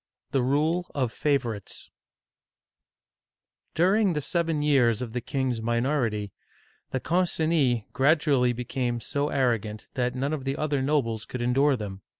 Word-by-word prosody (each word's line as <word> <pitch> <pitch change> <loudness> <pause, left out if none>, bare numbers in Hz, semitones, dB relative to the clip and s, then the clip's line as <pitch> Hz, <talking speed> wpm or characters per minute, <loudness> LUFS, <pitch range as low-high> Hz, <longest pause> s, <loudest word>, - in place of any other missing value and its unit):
THE 135 - +2
RULE 155 +7 +1
OF 130 -5 0
FAVORITES 120 -9 -2 1.8
DURING 190 +3 +3
the 150 - -1
seven 165 -1 0
years 125 -7 +3
of 115 -3 -7
the 125 - -2
king's 130 -2 -2
minority, 115 -3 0 0.6
the 130 - -2
Concinis 160 - +1
gradually 140 -2 +3
became 120 0 -2
so 145 +5 -2
arrogant 115 -6 -1
that 125 0 -1
none 140 +4 -1
of 145 -4 -3
the 135 +1 -2
other 145 -3 0
nobles 130 -6 0
could 125 -1 -4
endure 135 +4 +3
them. 100 -3 -6
130 Hz, 135 wpm, -26 LUFS, 120-150 Hz, 1.8 s, DURING